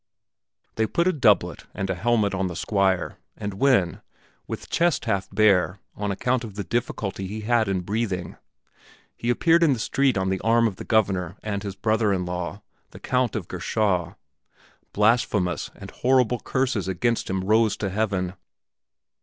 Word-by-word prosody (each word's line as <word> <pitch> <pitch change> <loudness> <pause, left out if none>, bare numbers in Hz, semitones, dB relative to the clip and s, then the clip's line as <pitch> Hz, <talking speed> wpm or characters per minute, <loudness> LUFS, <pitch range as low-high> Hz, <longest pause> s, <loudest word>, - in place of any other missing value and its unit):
They 110 0 +2
put 170 - +1
a 185 - +3
doublet 120 -8 +2
and 100 - -2
a 95 - 0
helmet 105 +2 +1
on 95 0 0
the 90 - -6
Squire 95 -1 0 0.2
and 105 -2 -4
when, 125 -11 +2 0.5
with - - -6
chest 170 -2 +1
half 95 -1 -1
bare 100 -3 +3 0.2
on 105 0 -2
account 125 +5 0
of 105 -4 -8
the 100 - -3
difficulty 100 -4 -3
he 110 +3 -5
had 115 0 +2
in 95 -2 0
breathing, 100 -2 -3 0.8
he 120 - -3
appeared 165 +7 +4
in 160 -4 +5
the 125 - -3
street 135 0 +1
on 95 0 0
the 95 0 -1
arm 115 +2 +3
of 100 -4 -5
the - - -7
Governor 95 -5 +1
and 100 -2 -2
his 100 -2 -5
brother 110 -1 +1
in 90 -2 0
law, 90 +3 -4 0.3
the - - -13
Count 125 -2 0
of 100 -6 -3
Gerschau, 90 -1 -1 0.8
blasphemous 105 -4 +1
and - - -10
horrible 125 -2 +2
curses 130 -7 -1
against 115 +5 0
him 95 0 -1
rose 110 +2 +3
to 100 -3 -3
heaven. 95 -3 -1
105 Hz, 170 wpm, -24 LUFS, 95-115 Hz, 0.8 s, in